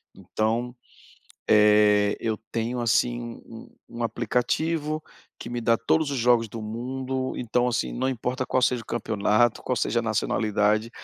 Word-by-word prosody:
Então, 115 +3 -2 0.7
eh, 105 -1 +5
eu 110 -1 -2
tenho, 115 +2 -2
assim, 120 0 0 0.5
um 120 - -6
aplicativo 150 +7 -1 0.4
que - - -8
me 120 0 -3
dá 115 0 +3
todos 145 +6 +1
os 140 - -2
jogos 120 -2 +3
do 110 +1 -7
mundo, 130 +4 -4
então, 125 +1 0
assim, 65 - -1
não 95 - -1
importa 130 +1 -2
qual 130 - +1
seja 125 -1 +2
o - - -20
campeonato, 110 0 +1
qual 125 - -1
seja 120 - 0
a - - 0
nacionalidade, 110 0 0
120 Hz, 145 wpm, -25 LUFS, 110-125 Hz, 0.7 s, eh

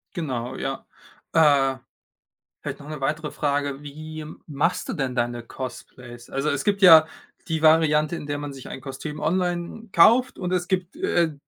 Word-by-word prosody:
Genau, 130 -7 -3
ja. 135 0 -4 0.5
Äh, 140 -4 +4 0.8
vielleicht - - -5
noch 145 - -11
'ne 155 -2 -6
weitere 150 +2 -2
Frage. 145 -1 -1
Wie 155 +2 -8 0.2
machst 155 +4 -1
du - - -1
denn 135 -6 -2
deine 120 0 -1
Cosplays? 120 -1 -9
Also, 135 +3 -1
es 140 -2 -1
gibt 200 -1 0
ja 160 -4 +9 0.4
die 160 -2 -1
Variante, 155 0 +4
in 150 - -7
der 145 0 -3
man 145 -1 -6
sich 135 -2 -10
ein - - -7
Kostüm 145 +3 -7
online 180 +5 -2
kauft, 235 +10 +5
und 180 -1 -3
es 180 -1 0
gibt, 185 -1 -2
äh, 175 - +1
150 Hz, 165 wpm, -24 LUFS, 135-170 Hz, 0.8 s, ja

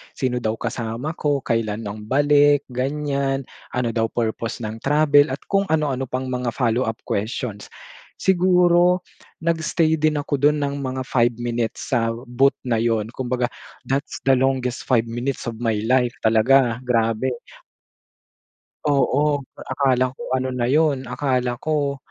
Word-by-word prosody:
Sino 125 -2 -1
daw 110 -1 -1
kasama 115 +5 -4
ko, 145 -2 0
kailan 115 -1 -1
ang 105 +1 -7
balik, 145 +2 +4
ganyan. 140 +1 -1 0.3
Ano 125 -2 0
daw 115 -1 0
purpose 115 +1 -3
ng 110 +1 -5
travel 145 +2 +4
at 130 +2 -4
kung 195 0 +2
ano 155 -2 +1
ano 130 0 -3
pang 130 +1 -3
mga 125 -2 -2
follow-up 115 -2 0
questions. 105 0 -3 0.6
Siguro 180 -1 +4 0.4
nag-stay 160 -1 +1
din 155 0 +2
ako 145 -1 -2
dun 150 +1 +3
ng 140 0 -2
mga 130 -1 -3
5 120 -2 +2
minutes 120 -1 -3
sa 120 -3 +2 0.2
booth 135 +3 +3
na 120 -3 0
yun. 115 -1 0
Kumbaga 125 -1 -2 0.3
that's 135 +3 -3
the 135 - +4
longest 130 -1 0
5 120 -3 +3
minutes 120 +3 -3
of 115 0 -8
my 110 -3 0
life 125 0 +2
talaga. 115 +2 +4
Grabe. 115 +1 +1 1.6
Oo, 145 0 +2 0.2
akala 130 -1 0
ko - - -13 0.2
ano 130 0 -2
na 120 -1 -1
yun, 145 -3 +2
akala 125 -2 -1
ko, 145 -1 -1
130 Hz, 145 wpm, -22 LUFS, 120-145 Hz, 1.6 s, balik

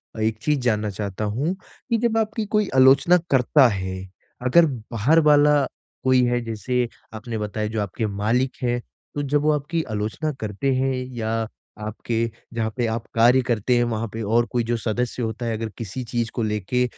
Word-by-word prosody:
अ, - - -7
एक 110 0 +1
चीज़ 150 +1 +1
जानना 110 -4 0
चाहता 100 +1 -4
हूँ 135 - -1
कि, 230 +4 -5
जब 225 0 +1
आपकी 220 0 0
कोई 210 -1 +1
आलोचना 135 +6 +6
करता 135 +1 +5
है, 95 -4 -3 0.5
अगर 165 +7 +6 0.3
बाहर 125 +9 +3
वाला 145 -1 +5 0.4
कोई 130 -1 +4
हैं 120 0 0
जैसे 120 +2 -1 0.3
आपने 110 +1 -5
बताया 105 0 -2
जो 110 0 -2
आपके 100 +3 -3
मालिक 110 +6 0
हैं। 120 0 +1 0.4
तो 145 - -1
जब 145 +1 +1
वो 155 +1 +3
आपकी 150 +3 -1
आलोचना 110 +9 -2
करते 110 +5 -1
हैं 130 +1 +1 0.2
या 110 -1 -2 0.6
आपके 110 +2 -4 0.4
जहाँ 115 -1 -1
पे 120 - +1
आप 115 +1 -2
कार्य 120 +3 +5
करते 120 +1 +1
हैं 120 - +3
वहाँ 115 0 -2
पे 115 - -4
और 115 +3 +2
कोई 120 -1 +1
जो 120 +1 -1
सदस्य 120 +3 -2
होता 110 +2 -3
है 115 -1 -1
अगर 115 0 -4
किसी 115 +3 -5
चीज़ 120 -1 -2
को 115 - 0
लेके 105 +3 0
120 Hz, 185 wpm, -23 LUFS, 110-135 Hz, 0.6 s, आलोचना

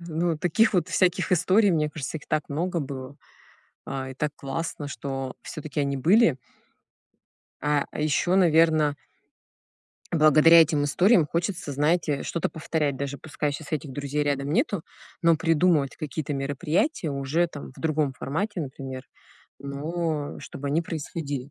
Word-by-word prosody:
Ну, 170 0 -1
вот 155 -2 -3
таких 210 +6 +3
вот 180 - +2
всяких 180 -1 +1
историй, 190 +4 +4
мне 155 -3 +1
кажется, 150 0 -5
их 150 - -11
так 155 -1 -1
много 170 +4 -1
было, 135 -1 -7 0.7
а, 135 -1 -4
и - - -7
так 150 +3 -2
классно, 145 +1 -4
что 135 -2 -5
всё-таки 155 -1 -4
они 140 -1 -1
были. 170 - +4 1.2
А, 150 0 +1
а - - -6
ещё, 155 +4 +2
наверно. 160 -4 +4 1.2
Благодаря 155 +1 +7
этим 150 -2 +1
историям 175 +4 +4
хочется, 175 0 -2
знаете, 150 +1 +1
э, - - -4
что-то 170 - -2
повторять. 155 -3 -2
Даже 140 +1 -4
пускай 150 +1 -3
щас 145 +1 -8
этих 150 -2 -3
друзей 145 +2 -2
рядом 140 0 -1
нету, 200 - +1 0.4
но 165 -1 +5
придумывать 160 -3 +2
какие-то 150 0 -4
мероприятия 150 - -1
уже 140 +5 0
там 145 -4 -9
в - - -12
другом 155 -3 0
формате, 185 +10 -3
например, 130 -2 -6 0.5
но 150 +2 -3
чтобы 140 +1 -6
они 155 +4 +1
происходили. 145 -4 -5
150 Hz, 150 wpm, -26 LUFS, 140-170 Hz, 1.2 s, Благодаря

